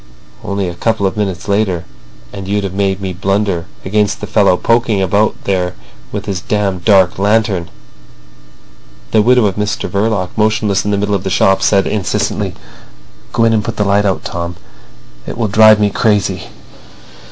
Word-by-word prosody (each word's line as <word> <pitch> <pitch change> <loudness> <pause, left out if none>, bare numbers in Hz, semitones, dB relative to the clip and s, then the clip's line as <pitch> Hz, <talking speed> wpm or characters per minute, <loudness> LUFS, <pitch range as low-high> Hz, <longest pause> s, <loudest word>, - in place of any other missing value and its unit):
"Only 100 -2 -2
a 90 - -4
couple 110 +2 -1
of 95 - -1
minutes 95 -4 -3
later 100 -4 0 0.5
and 95 -1 -7
you'd 100 +1 0
have 95 -2 -4
made 95 0 -1
me 95 -1 -3
blunder 95 -2 -1 0.2
against 105 +1 0
the - - -5
fellow 100 -4 +3
poking 115 -2 +1
about 100 +3 +1
here 90 -2 -1 0.4
with - - -4
his 95 -3 -3
damned 100 -4 -1
dark 95 -3 +4
lantern." 100 -4 +1 1.4
The 110 - +4
widow 125 +1 +4
of 100 -1 -1
Mr 105 -1 -2
Verloc, 100 -2 -1
motionless 110 -2 +1
in - - 0
the 100 - +1
middle 105 +1 -1
of 95 -2 -1
the 95 - -2
shop, 95 +1 +2
said 100 -1 +3
insistently: 100 -5 -2 0.8
"Go 115 - +1
in 115 0 +3
and 110 -2 +1
put - - -5
that 105 - +1
light 100 +1 +2
out, 95 -2 0
Tom. 85 0 -4 0.7
It - - -6
will 115 -2 0
drive 110 +1 +6
me 105 -1 +2
crazy." 100 -3 0
100 Hz, 175 wpm, -15 LUFS, 95-105 Hz, 1.4 s, drive